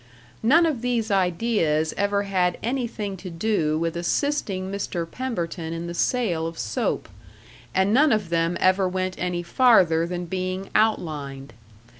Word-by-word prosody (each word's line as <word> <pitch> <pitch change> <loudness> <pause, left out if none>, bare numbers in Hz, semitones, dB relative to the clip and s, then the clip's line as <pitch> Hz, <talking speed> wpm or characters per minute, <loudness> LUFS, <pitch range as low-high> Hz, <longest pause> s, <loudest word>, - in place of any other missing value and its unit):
None 310 +10 +5
of 295 -8 -1
these 235 -3 -1
ideas 180 -4 +1
ever 200 0 +1
had 180 -3 0
anything 230 -5 -2
to 185 +1 -8
do 165 -3 0
with 165 +1 -1
assisting 190 - -1
Mr. 195 -3 -3
Pemberton 170 -7 -4
in 165 +1 -4
the 170 - -5
sale 175 -6 0
of 165 0 -7
soap, 105 - -2 0.7
and 190 +2 +3
none 295 +5 +5
of 210 -6 +1
them 170 +1 +1
ever 185 0 +3
went 185 0 -2
any 175 -1 -2
farther 170 -6 +4
than 175 0 -4
being 185 +2 -4
outlined. 150 -10 -1
185 Hz, 145 wpm, -24 LUFS, 170-220 Hz, 0.7 s, None